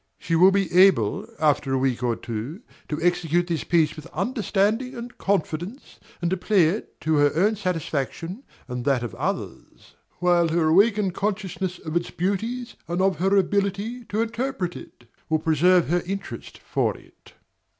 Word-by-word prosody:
DOMINIE. -, -, -19 dB
She 165 Hz, -, +2 dB
will 185 Hz, +4 st, +7 dB
be 195 Hz, -3 st, 0 dB
able, 180 Hz, -, +4 dB
after 145 Hz, -3 st, +2 dB
a -, -, +2 dB
week 130 Hz, -2 st, 0 dB
or 120 Hz, -2 st, +1 dB
two, 120 Hz, -, -6 dB, 0.3 s
to 150 Hz, -, -2 dB
execute 175 Hz, -1 st, +2 dB
this 170 Hz, -2 st, -2 dB
piece 165 Hz, -3 st, +2 dB
with 155 Hz, -, -10 dB
understanding 220 Hz, +4 st, 0 dB
and 240 Hz, 0 st, -8 dB
confidence, 190 Hz, -, -2 dB, 0.2 s
and 170 Hz, -, +1 dB
to 190 Hz, -, +1 dB
play 195 Hz, 0 st, +3 dB
it 205 Hz, +6 st, -5 dB
to 155 Hz, -1 st, +1 dB
her 145 Hz, 0 st, +4 dB
own 205 Hz, +6 st, +3 dB
satisfaction 170 Hz, -, -3 dB, 0.3 s
and 125 Hz, -1 st, -4 dB
that 135 Hz, -4 st, +2 dB
of 120 Hz, -, -5 dB
others; -, -, -5 dB, 0.2 s
while 175 Hz, -1 st, +3 dB
her 160 Hz, -1 st, +2 dB
awakened 200 Hz, +2 st, +4 dB
consciousness 190 Hz, -3 st, -2 dB
of 160 Hz, -1 st, -7 dB
its 170 Hz, 0 st, 0 dB
beauties 225 Hz, +7 st, -2 dB
and 175 Hz, +1 st, -2 dB
of 190 Hz, -4 st, +2 dB
her 195 Hz, +2 st, +3 dB
ability 200 Hz, +5 st, 0 dB
to 220 Hz, +2 st, 0 dB
interpret 225 Hz, -6 st, -3 dB
it 120 Hz, -, -12 dB, 0.2 s
will 160 Hz, -, +3 dB
preserve 165 Hz, +3 st, +3 dB
her 175 Hz, +1 st, +2 dB
interest 195 Hz, +1 st, -6 dB
for -, -, -1 dB
it. -, -, -20 dB
180 Hz, 170 wpm, -24 LUFS, 160-200 Hz, 0.3 s, will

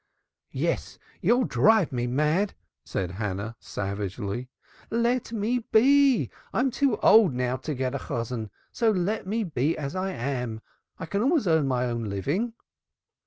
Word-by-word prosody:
"Yes, -, -, -1 dB, 0.2 s
you'll 245 Hz, +2 st, +3 dB
drive 220 Hz, -6 st, +3 dB
me 120 Hz, -2 st, -1 dB
mad," 150 Hz, +10 st, +1 dB, 0.3 s
said 90 Hz, -2 st, -3 dB
Hannah 100 Hz, +2 st, -4 dB
savagely. 100 Hz, +4 st, -4 dB, 0.4 s
"Let 235 Hz, +1 st, 0 dB
me 230 Hz, +3 st, 0 dB
be! 270 Hz, +4 st, +4 dB, 0.2 s
I'm 255 Hz, +2 st, +1 dB
too 270 Hz, -2 st, +1 dB
old 210 Hz, -, +6 dB
now 125 Hz, 0 st, 0 dB
to 145 Hz, +3 st, -4 dB
get 130 Hz, 0 st, -2 dB
a 140 Hz, -, -2 dB
Chosan, 115 Hz, -4 st, -4 dB, 0.2 s
so 230 Hz, -, +2 dB
let 200 Hz, +1 st, 0 dB
me 220 Hz, +3 st, 0 dB
be 155 Hz, -3 st, 0 dB
as 140 Hz, 0 st, -4 dB
I 185 Hz, +1 st, -1 dB
am. 125 Hz, -6 st, -3 dB, 0.4 s
I -, -, -5 dB
can 200 Hz, +5 st, -1 dB
always 280 Hz, +1 st, +2 dB
earn 160 Hz, -4 st, +3 dB
my 125 Hz, -1 st, +1 dB
own 120 Hz, -2 st, -2 dB
living." 145 Hz, -, -1 dB
150 Hz, 150 wpm, -26 LUFS, -, 0.4 s, old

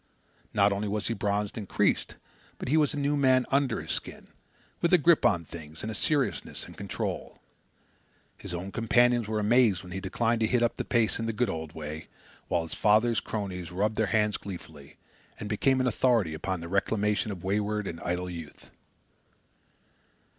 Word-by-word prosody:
Not 100 Hz, 0 st, +3 dB
only 100 Hz, +1 st, -2 dB
was 105 Hz, +1 st, -2 dB
he -, -, +1 dB
bronzed 105 Hz, 0 st, -1 dB
and 100 Hz, -, -8 dB
creased, -, -, +1 dB, 0.4 s
but -, -, -5 dB
he 150 Hz, -, +3 dB
was 150 Hz, -2 st, +3 dB
a -, -, -4 dB
new 145 Hz, +1 st, +1 dB
man 130 Hz, -2 st, +4 dB
under 135 Hz, -4 st, +2 dB
his -, -, -5 dB
skin, -, -, -5 dB, 0.5 s
with 170 Hz, -, +2 dB
a -, -, +9 dB
grip 170 Hz, +1 st, +5 dB
on 85 Hz, -4 st, 0 dB
things 80 Hz, -1 st, -9 dB
and 110 Hz, -, -3 dB
a -, -, -4 dB
seriousness 130 Hz, -, 0 dB
and -, -, -12 dB
control. -, -, -4 dB, 1.0 s
His 100 Hz, -, -9 dB
old 90 Hz, +3 st, -5 dB
companions 120 Hz, 0 st, +3 dB
were 110 Hz, 0 st, -1 dB
amazed 105 Hz, -3 st, +3 dB
when 90 Hz, -, -11 dB
he 95 Hz, -, -3 dB
declined 115 Hz, +4 st, 0 dB
to 110 Hz, -, +3 dB
hit 120 Hz, +1 st, +2 dB
up 120 Hz, -, +1 dB
the -, -, -3 dB
pace 115 Hz, -2 st, +2 dB
in 115 Hz, -, -2 dB
the 115 Hz, -, -1 dB
good 110 Hz, -1 st, 0 dB
old 80 Hz, -2 st, -5 dB
way, 80 Hz, 0 st, -6 dB, 0.4 s
while 85 Hz, -2 st, +1 dB
his 80 Hz, -, -6 dB
father's 110 Hz, +2 st, +3 dB
crony 100 Hz, -4 st, -4 dB
rubbed 100 Hz, +6 st, -2 dB
hands 105 Hz, 0 st, +2 dB
gleefully, 80 Hz, -7 st, -10 dB, 0.4 s
and 105 Hz, -, -5 dB
became 130 Hz, +6 st, +2 dB
an 130 Hz, -, +2 dB
authority 115 Hz, -7 st, +2 dB
upon 90 Hz, +2 st, -3 dB
the 85 Hz, -, -6 dB
reclamation 105 Hz, +3 st, 0 dB
of 90 Hz, -4 st, -7 dB
wayward 105 Hz, +2 st, 0 dB
and 85 Hz, -3 st, -5 dB
idle 90 Hz, +1 st, -2 dB
youth. 85 Hz, -4 st, -9 dB
105 Hz, 185 wpm, -28 LUFS, 90-120 Hz, 1.0 s, a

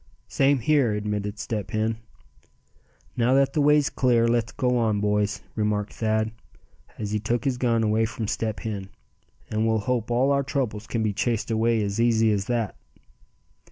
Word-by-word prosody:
"Same 140 Hz, +1 st, +3 dB
here," 135 Hz, -4 st, +3 dB
admitted 105 Hz, 0 st, -3 dB
Step 105 Hz, -2 st, -4 dB
Hen. 110 Hz, +1 st, -1 dB, 1.2 s
"Now 125 Hz, +2 st, +2 dB
that 135 Hz, 0 st, +3 dB
the 150 Hz, -, +1 dB
way's 150 Hz, 0 st, +4 dB
clear, 120 Hz, -3 st, +2 dB
let's 115 Hz, -1 st, +1 dB
go 125 Hz, -1 st, 0 dB
on, 110 Hz, -3 st, +1 dB
boys," 105 Hz, 0 st, 0 dB
remarked 105 Hz, -1 st, -1 dB
Thad, 110 Hz, 0 st, 0 dB, 0.7 s
as 105 Hz, -1 st, -4 dB
he 105 Hz, -, 0 dB
took 115 Hz, +5 st, -2 dB
his 130 Hz, -3 st, 0 dB
gun 115 Hz, -3 st, +2 dB
again 110 Hz, +1 st, +2 dB
from 115 Hz, -1 st, -5 dB
Step 110 Hz, 0 st, -2 dB
Hen; 100 Hz, -3 st, -5 dB, 0.6 s
"and 110 Hz, +1 st, +1 dB
we'll 110 Hz, 0 st, +2 dB
hope 115 Hz, +1 st, -1 dB
all 125 Hz, +4 st, +2 dB
our 140 Hz, 0 st, +3 dB
troubles 125 Hz, -7 st, -3 dB
can 115 Hz, -2 st, -1 dB
be 105 Hz, -2 st, 0 dB
chased 115 Hz, +2 st, -1 dB
away 115 Hz, 0 st, +2 dB
as 100 Hz, +2 st, -1 dB
easy 115 Hz, -2 st, +3 dB
as 100 Hz, -2 st, 0 dB
that." 115 Hz, -3 st, -1 dB
110 Hz, 170 wpm, -25 LUFS, 105-120 Hz, 1.2 s, way's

